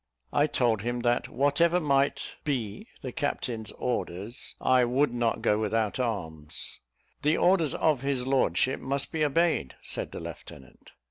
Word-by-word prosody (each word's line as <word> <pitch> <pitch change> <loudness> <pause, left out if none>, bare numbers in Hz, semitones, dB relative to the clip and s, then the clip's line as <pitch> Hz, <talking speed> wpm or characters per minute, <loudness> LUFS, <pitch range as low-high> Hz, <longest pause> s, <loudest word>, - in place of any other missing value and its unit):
I 145 +1 +4
told 120 -7 +1
him, 120 +2 -2
that 120 0 +1
whatever 160 +6 +3
might 140 -3 +1
me 130 - -3 0.2
the 130 - -4
captain's 120 -8 -3
orders, 115 -2 -3
I 130 -1 +4
would 125 +3 +2
not 120 -1 0
go 105 - +3
without 110 0 0
arms. 80 -11 -3 0.4
"The 150 +2 +3
orders 175 -5 +3
of 150 -6 +2
his 135 -2 0
lordship 135 0 +2
must 135 +1 -1
be 160 -2 0
obeyed," 155 - +1
said - - -3
the - - -6
lieutenant. 65 -1 -11
130 Hz, 145 wpm, -28 LUFS, 115-145 Hz, 0.4 s, I